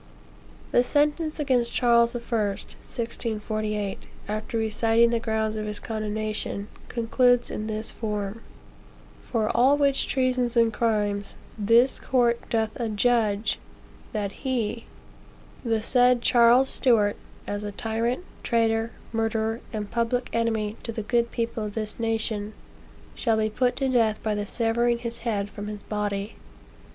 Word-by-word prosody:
The 245 - +5
sentence 300 +4 +1
against 250 -5 +1
Charles 235 -1 +4
the 240 - -2
First, 215 -4 -2
(1648,) 215 -3 -3 0.2
after 215 +2 -3
reciting 225 +1 +3
the 235 - +1
grounds 220 -1 -1
of 215 0 -3
his 210 -1 -3
condemnation, 215 -2 -3 0.2
concludes 245 +1 +2
in 215 - -4
this 215 0 -3
form: 210 -1 -4 0.8
"For 220 -3 -1
all 260 +4 +5
which 280 -2 +2
treasons 255 -2 +1
and 230 -1 +4
crimes, 210 -3 0 0.2
this 230 +5 +4
court 240 -2 +1
doth 220 -2 +1
adjudge, 220 -2 +1 0.5
that 205 -2 -2
he, 240 -4 -2 0.8
the 225 -3 0
said 245 0 +4
Charles 240 +2 +6
Stuart, 220 -7 +3 0.3
as 205 0 -3
a 205 - -4
tyrant, 230 - -2 0.2
traitor, 225 -1 +1 0.2
murderer, 225 0 0
and 210 -2 -4
public 240 +1 0
enemy 225 -2 0
to 230 - -5
the 220 -1 -4
good 235 +2 +1
people 230 -2 -2
of 210 -1 -5
this 215 -1 -4
nation, 220 -2 -1 0.6
shall 225 - +1
be 215 0 +1
put 250 +2 +1
to 270 - 0
death 230 -4 +2
by 215 - 0
the 205 0 -3
severing 235 +2 +1
his 235 0 -6
head 215 -4 -1
from 205 0 -7
his 210 -1 -6
body." 205 0 -3
225 Hz, 140 wpm, -26 LUFS, 215-240 Hz, 0.8 s, Charles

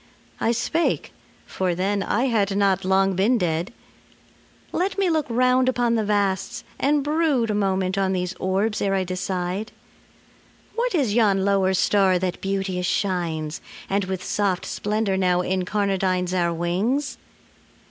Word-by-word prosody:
I 230 - +2
spake 240 +8 -1 0.3
for 185 -2 -1
then 195 +3 0
I 210 +4 0
had 205 -5 +1
not 195 -2 +2
long 190 0 +2
been 215 +7 +3
dead 175 +1 -1 1.0
"Let 375 +3 -1
me 385 -3 +2
look 315 -3 0
round 255 +2 +3
upon 245 -2 +1
the 225 -2 +1
vasts, 200 -2 -1 0.2
and 290 0 +2
brood 295 -6 +1
A - - 0
moment 190 -1 0
on 190 -1 +1
these 180 0 -2
orbs 195 +4 0
ere 195 -1 +1
I 190 - +1
decide... 185 +2 -3 1.0
What 475 -2 -1
is 265 -10 +1
yon 200 -4 +3
lower 195 -1 +2
star 190 0 +3
that 180 0 -3
beauteous 190 -2 -2
shines 165 -7 -1 0.3
And 200 0 +1
with 185 -1 -4
soft 195 -4 -1
splendor 210 -2 -1
now 180 -1 +2
incarnadines 185 -1 0
Our 175 -2 +1
wings? 195 - -1
195 Hz, 145 wpm, -23 LUFS, 185-225 Hz, 1.0 s, been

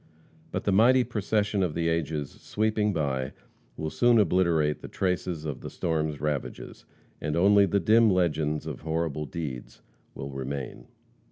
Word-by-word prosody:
But - - -3
the 100 - +1
mighty 125 +6 +5
procession 105 -3 0
of 90 -5 0
the 85 0 0
ages, 80 -3 -1
sweeping 105 0 0
by, 70 -6 -2 0.4
will 80 0 -3
soon 120 -1 +4
obliterate 85 -6 +2
the - - -7
traces 90 -4 -2
of 75 -4 -4
the - - -6
storm's 80 -3 -2
ravages, 75 -1 -4 0.4
and 75 0 -2
only 100 +3 +5
the 100 +3 +2
dim 110 +5 +5
legends 80 -5 +1
of 75 -5 -6
horrible 80 -2 -2
deeds 70 -5 -6 0.3
will 70 +1 -6
remain. 65 0 -5
80 Hz, 150 wpm, -27 LUFS, 75-100 Hz, 0.4 s, mighty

